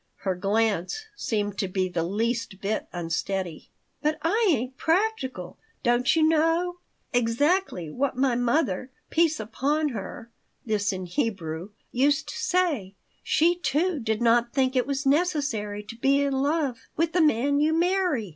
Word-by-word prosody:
(Her 190 -2 0
glance 205 - 0
seemed 205 - -2
to 195 - 0
be 185 0 0
the 175 -2 -2
least 225 +2 -2
bit 205 +2 -2
unsteady.) 175 0 -3 0.3
"But 305 +1 +1
I 430 +7 +2
ain't 255 -4 0
'practical,' 320 - -1 0.2
don't 245 +2 +3
you 320 - +3
know. 330 +3 +2 0.3
Exactly 245 - +1
what 260 - -1
my 260 -1 +2
mother 245 - 0 0.2
peace 325 -3 +2
upon 285 +8 0
her 230 +1 -7 0.3
[this 210 -2 0
in 185 -1 -4
Hebrew] 180 - -3 0.2
used 285 +4 +2
to - - -6
say. 355 - 0 0.3
She, 335 +3 +3
too, 340 +1 0
did 220 -1 -1
not 235 0 +3
think 260 -1 +1
it 250 -1 +2
was 275 0 -2
necessary 275 -10 0
to 210 - -9
be 275 +4 +3
in 280 -1 0
love 280 -1 0 0.2
with 330 +1 0
the 355 - +3
man 285 -1 +3
you 305 +2 +3
marry. 340 - +1
255 Hz, 150 wpm, -26 LUFS, 210-310 Hz, 0.3 s, don't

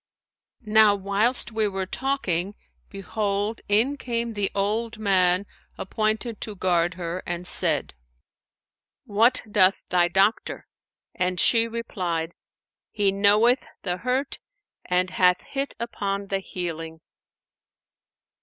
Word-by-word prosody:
Now 215 -1 +5
whilst 205 +6 0
we 220 -1 +1
were 195 -1 -3
talking, 200 -6 -2 0.3
behold, 205 +2 -3
in 235 +8 +2
came 235 -3 -3
the 205 -2 -1
old 220 +3 -1
man 185 -2 +2 0.3
appointed 215 +3 -2
to 215 - -6
guard 175 -2 +1
her 175 0 -4
and 175 +1 -4
said, - - +2 1.1
'What 230 +5 +3
doth 190 -2 +3
thy 175 -1 +3
doctor?'; 195 +5 +1 0.5
and 180 0 -1
she 230 +4 +4
replied, 180 -8 -3 0.6
'He 205 -2 +1
knoweth 210 +6 +4 0.2
the 180 -2 -2
hurt 255 +6 -2 0.5
and 180 0 +1
hath 180 -1 +3
hit 275 0 -4
upon 200 -4 -3
the 195 - 0
healing.'" 165 -4 -6
200 Hz, 110 wpm, -24 LUFS, 180-225 Hz, 1.1 s, Now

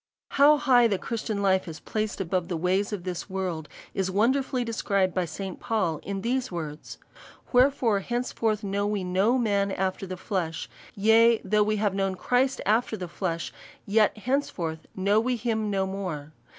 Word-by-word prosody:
How 290 +2 +6
high 250 -4 +5
the 200 -4 0
Christian 215 -1 -3
life 190 -1 +2
is 160 -2 -7
placed 215 -1 -3
above 185 -1 -1
the 175 -3 -2
ways 185 +5 +1
of 200 -4 -4
this 180 +1 -5
world, 180 -5 -3 0.2
is 190 -1 -1
wonderfully 250 +6 +1
described 200 -5 0
by 185 -2 0
St. 185 +3 -6
Paul 185 -9 -1
in 195 -1 -4
these 250 +2 -1
words: 155 -3 -6 0.3
" - - -22
Wherefore 250 -4 +4
henceforth 225 -1 -1
know 200 +1 -1
we 205 -2 -1
no 190 +7 +2
man 200 -4 +1
after 190 0 -2
the 185 0 -5
flesh; 175 -4 -3 0.3
yea, 225 +2 +5
though 210 +2 +2
we 215 +1 +2
have 205 -2 0
known 195 -1 0
Christ 255 +6 +1
after 220 +2 +1
the 180 - -5
flesh; 170 -1 -3 0.3
yet 215 +1 +3
henceforth 200 - -2
we 185 - -5
know 205 +3 +3
him 225 -3 0
no 195 -1 0
more. 180 -6 -5
200 Hz, 175 wpm, -26 LUFS, 185-225 Hz, 0.3 s, How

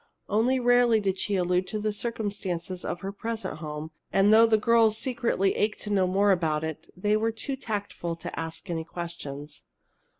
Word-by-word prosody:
Only 245 +5 +2
rarely 245 -2 +4
did 195 -2 -1
she 205 - 0
allude 180 0 +1
to 215 - -3
the 215 0 0
circumstances 200 -5 -3
of 175 - -4
her 195 - -4
present 225 -3 -4
home, 155 0 -6 0.2
and 200 +2 +5
though 225 +1 +8
the 220 -1 +4
girls 225 0 +4
secretly 235 -7 +1
ached 215 +1 0
to 210 - -5
know 190 -2 +3
more 200 +2 +3
about 160 -4 +1
it, 160 -1 -5
they 210 +3 +2
were 225 +1 +1
too 245 +5 -3
tactful 205 -8 -4
to 165 - -6
ask 165 +4 -5
any 165 -1 -2
questions. 150 -4 -7
200 Hz, 180 wpm, -27 LUFS, 170-220 Hz, 0.2 s, though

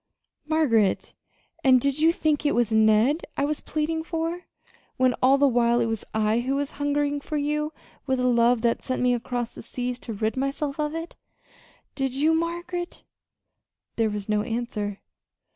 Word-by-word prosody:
"Margaret! 250 -11 +2 0.5
And 260 -1 +6
did 280 +3 0
you 320 +2 +5
think 310 -3 0
it 290 - +1
was 240 -2 +1
Ned 220 +8 +4
I 280 - +2
was 300 +1 -2
pleading 315 +1 -2
for, 330 +2 -3 0.5
when 255 -1 +3
all 265 +2 +5
the 285 0 +4
while 240 -1 +3
it 235 - +2
was 225 -2 -2
I 220 +1 +1
who 260 +3 -1
was 285 0 -2
hungering 290 0 0
for 305 +1 -3
you 300 +1 -1 0.4
with 260 -1 +1
a 250 - +1
love 240 -1 +3
that 235 -1 +1
sent 255 -1 -2
me 250 0 +3
across 240 0 -3
the - - -9
seas 245 +1 -4
to 230 - -6
rid 215 +2 -1
myself 275 +2 -2
of 300 +1 -1
it? 330 +1 -6 0.8
Did 270 -2 -2
you, 305 +4 +3
Margaret?" 345 +2 -3 0.9
There 225 -1 +2
was 205 -1 -5
no 210 -1 +1
answer. 215 -3 -3
265 Hz, 175 wpm, -25 LUFS, 235-300 Hz, 0.9 s, And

